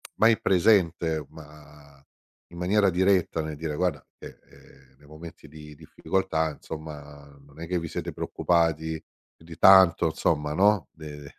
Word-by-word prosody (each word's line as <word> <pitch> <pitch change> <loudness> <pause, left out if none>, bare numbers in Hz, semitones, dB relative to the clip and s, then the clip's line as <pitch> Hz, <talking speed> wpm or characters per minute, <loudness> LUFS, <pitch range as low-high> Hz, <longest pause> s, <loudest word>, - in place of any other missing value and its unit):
mai 110 0 +3
presente, 85 -5 +1
ma 75 -2 -17 0.5
in 85 - -13
maniera 100 +3 +2
diretta 90 -2 +1
nel 80 -1 -6
dire: 75 0 -5
"Guarda 90 +2 -2
che, - - -12
ehm, 65 0 -22
nei 70 +1 -22
momenti 80 +1 -13
di 75 0 -13
difficoltà, 80 -1 -2
insomma, 75 -2 -10 0.2
non 70 +3 -16
è 85 - -6
che 90 -1 -1
vi 85 - -6
siete - - -6
preoccupati 80 -2 -1 0.3
più 80 - -21
di 85 -1 -12
tanto, 95 -3 +6
insomma 75 -1 -1
no, 100 +1 +2
de 75 -3 -11
80 Hz, 150 wpm, -25 LUFS, 75-90 Hz, 0.5 s, tanto